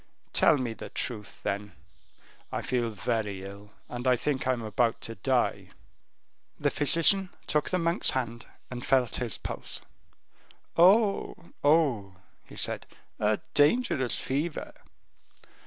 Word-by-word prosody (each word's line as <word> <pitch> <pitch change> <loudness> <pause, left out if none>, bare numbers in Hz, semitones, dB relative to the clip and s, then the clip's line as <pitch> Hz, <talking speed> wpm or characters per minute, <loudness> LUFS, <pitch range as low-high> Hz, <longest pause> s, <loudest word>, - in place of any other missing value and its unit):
Tell - - +5
me 125 -4 -2
the - - -9
truth, 105 -4 -5
then; 100 0 -3 0.8
I - - -3
feel 120 -2 0
very 105 -2 -2
ill, 100 +1 -10 0.2
and 125 +1 -4
I 125 - +6
think 130 +1 -1
I 130 - +4
am 120 -2 -4
about 115 +2 +1
to 115 - -6
die." 95 - 0 0.9
The - - +1
physician 170 +6 +4 0.2
took 150 - +1
the 185 - +1
monk's 170 0 +2
hand, 120 -3 -2 0.2
and 125 -1 -5
felt 130 -3 +2
his 120 -5 -3
pulse. - - -5 0.9
"Oh, 195 +4 +5 0.3
oh," 140 -11 +3 0.3
he - - -14
said, - - -1 0.3
"a 105 0 +1
dangerous 145 - +3
fever." 150 +5 -2
125 Hz, 130 wpm, -28 LUFS, 110-150 Hz, 0.9 s, I